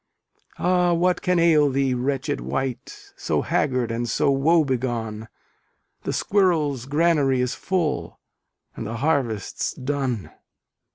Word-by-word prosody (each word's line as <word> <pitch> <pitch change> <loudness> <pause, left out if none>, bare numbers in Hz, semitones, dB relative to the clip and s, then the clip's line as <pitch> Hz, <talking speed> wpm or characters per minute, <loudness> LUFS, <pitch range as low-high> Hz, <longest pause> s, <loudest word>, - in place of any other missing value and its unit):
Ah 180 0 +2
what 180 +2 +1
can 180 0 +1
ail 160 -4 +4
thee, 135 -1 +1
wretched 135 +3 -2
wight, 135 - -5
So 390 - -1
haggard 125 -5 0
and 120 +1 -2
so 140 +5 +2
woe 155 +4 +3
begone? 115 -4 -3 0.8
The - - -1
squirrel's 155 - +1
granary 145 -3 +2
is 125 +1 0
full, 175 -5 -2 0.6
And - - -5
the 115 - -4
harvest's 130 -7 -1
done. 130 -5 -3
140 Hz, 120 wpm, -23 LUFS, 125-170 Hz, 0.8 s, ail